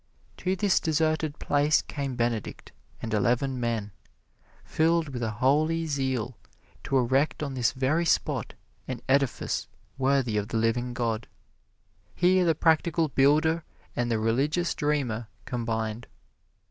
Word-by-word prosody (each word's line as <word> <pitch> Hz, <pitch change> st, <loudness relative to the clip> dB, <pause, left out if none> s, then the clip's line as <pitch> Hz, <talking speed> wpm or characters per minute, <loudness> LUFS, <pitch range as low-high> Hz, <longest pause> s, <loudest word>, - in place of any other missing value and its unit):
To 185 Hz, +1 st, -1 dB
this 200 Hz, -1 st, +2 dB
deserted 155 Hz, -1 st, 0 dB
place 145 Hz, +1 st, +2 dB
came 140 Hz, -3 st, -4 dB
Benedict 120 Hz, -3 st, -2 dB, 0.3 s
and 115 Hz, -1 st, -3 dB
eleven 125 Hz, +4 st, +1 dB
men, 115 Hz, -4 st, -2 dB, 0.7 s
filled 165 Hz, -1 st, +1 dB
with 125 Hz, -3 st, -5 dB
a 115 Hz, -, 0 dB
holy 150 Hz, +8 st, +1 dB
zeal 130 Hz, -5 st, -2 dB, 0.5 s
to 135 Hz, -, +1 dB
erect 130 Hz, +5 st, +1 dB
on 140 Hz, -2 st, -3 dB
this 125 Hz, -4 st, +1 dB
very 135 Hz, +6 st, +1 dB
spot 165 Hz, -, 0 dB, 0.3 s
an 130 Hz, -3 st, -4 dB
edifice 135 Hz, -1 st, +1 dB, 0.3 s
worthy 130 Hz, -4 st, +2 dB
of 105 Hz, 0 st, -1 dB
the 115 Hz, -, -2 dB
living 120 Hz, +2 st, 0 dB
God. 115 Hz, -2 st, -2 dB, 0.9 s
Here 180 Hz, +1 st, +4 dB
the 165 Hz, -2 st, +3 dB
practical 160 Hz, 0 st, +2 dB
builder 155 Hz, +5 st, +3 dB, 0.3 s
and 120 Hz, 0 st, 0 dB
the 115 Hz, -, +1 dB
religious 135 Hz, +10 st, +1 dB
dreamer 130 Hz, -7 st, -1 dB, 0.2 s
combined. 115 Hz, -2 st, -3 dB
135 Hz, 130 wpm, -27 LUFS, 120-155 Hz, 0.9 s, Here